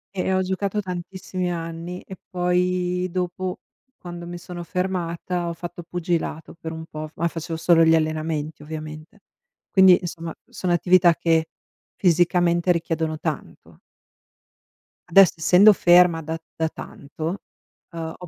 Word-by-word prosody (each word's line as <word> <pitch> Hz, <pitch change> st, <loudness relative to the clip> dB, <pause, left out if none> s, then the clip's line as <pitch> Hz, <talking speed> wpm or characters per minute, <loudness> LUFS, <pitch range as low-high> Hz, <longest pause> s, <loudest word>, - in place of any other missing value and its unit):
Eh, 190 Hz, 0 st, -1 dB
ho 190 Hz, 0 st, +2 dB
giocato 195 Hz, +2 st, -2 dB
tantissimi 185 Hz, -1 st, -4 dB
anni 165 Hz, +1 st, -5 dB
e 190 Hz, -, -10 dB
poi 180 Hz, 0 st, 0 dB
dopo, 180 Hz, +1 st, -3 dB, 0.4 s
quando 175 Hz, -1 st, -8 dB
mi 175 Hz, 0 st, -6 dB
sono 175 Hz, 0 st, -8 dB
fermata, 180 Hz, -1 st, -2 dB
ho 170 Hz, -, -2 dB
fatto 175 Hz, +1 st, -8 dB
pugilato 170 Hz, -2 st, -3 dB
per 160 Hz, -1 st, -7 dB
un 160 Hz, 0 st, -7 dB
po', 155 Hz, -1 st, -7 dB
f 155 Hz, -, -21 dB
ma 170 Hz, -, 0 dB
facevo 165 Hz, 0 st, -5 dB
solo 165 Hz, 0 st, +4 dB
gli 160 Hz, 0 st, +5 dB
allenamenti 155 Hz, -1 st, -2 dB
ovviamente. 155 Hz, +1 st, -9 dB, 0.5 s
Quindi, 190 Hz, -2 st, +7 dB
insomma, 170 Hz, -2 st, -6 dB, 0.2 s
sono 180 Hz, -, -3 dB
attività 175 Hz, 0 st, +4 dB
che 165 Hz, -1 st, +1 dB, 0.5 s
fisicamente 175 Hz, 0 st, +3 dB
richiedono 165 Hz, -2 st, -1 dB
tanto. 155 Hz, -1 st, -6 dB, 1.3 s
Adesso 190 Hz, +1 st, +7 dB
essendo 185 Hz, +6 st, +6 dB
ferma 175 Hz, -2 st, +5 dB
da 160 Hz, +2 st, -4 dB, 0.2 s
da 160 Hz, 0 st, 0 dB
tanto, 160 Hz, +5 st, -6 dB, 0.5 s
uhm, 165 Hz, -1 st, -5 dB
ho 180 Hz, -, -10 dB
175 Hz, 135 wpm, -23 LUFS, 160-180 Hz, 1.3 s, Quindi